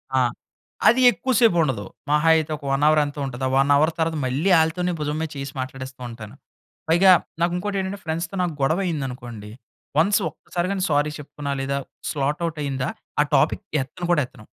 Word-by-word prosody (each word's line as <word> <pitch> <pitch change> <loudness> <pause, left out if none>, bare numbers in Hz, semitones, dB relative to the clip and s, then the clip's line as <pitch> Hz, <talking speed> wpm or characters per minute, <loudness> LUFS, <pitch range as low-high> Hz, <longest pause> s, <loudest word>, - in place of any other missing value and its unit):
ఆ! - - +4 0.7
అది 240 +4 +5
ఎక్కువ 260 +1 -3
సేపు 225 -7 +5
ఉండదు. 130 -9 -1 0.2
మహా 150 +2 +3
అయితే 160 -1 0
ఒక 145 - -20
1 135 +1 +1
హౌర్ 155 0 +5
ఎంతో 145 0 -5
ఉంటది. 130 -1 -6
ఆ - - -1
1 140 +1 +3
హౌర్ 155 +3 +4
తర్వాత 160 -1 0
మళ్ళీ 140 +9 0
ఆళ్ళతోనే 175 +3 +1
భుజం 150 0 -2
మీద 160 - -2
చేయ్యేసి 140 0 -6
మాట్లాడేస్తూ 130 0 -6
ఉంటాను. 115 0 -10 0.5
పైగా 185 +3 +6 0.3
నాకు 170 +1 +2
ఇంకోటి 200 +2 -3
ఏంటంటే, 195 +1 -4
ఫ్రెండ్స్‌తో 160 +3 -3
నాకు 175 -2 -1
గొడవ 160 +7 +2
అయింది 155 -6 -2
అనుకోండి, 120 -5 -9 0.5
వన్స్ 205 +6 +4
ఒక్కసారి 175 0 -4
గాని 195 -2 -1
సారీ 145 0 +2
చెప్పుతున్నా 145 -1 -5
లేదా, 140 +1 -1 0.3
స్లాట్ 145 +3 -1
ఔట్ 160 -2 -6
అయిందా, 135 -2 -2 0.3
ఆ - - +5
టాపిక్ 135 - +2 0.2
ఎత్తను 175 +7 -7
కూడా 150 -4 +3
ఎత్తను. 110 - -17
150 Hz, 190 wpm, -23 LUFS, 135-170 Hz, 0.7 s, పైగా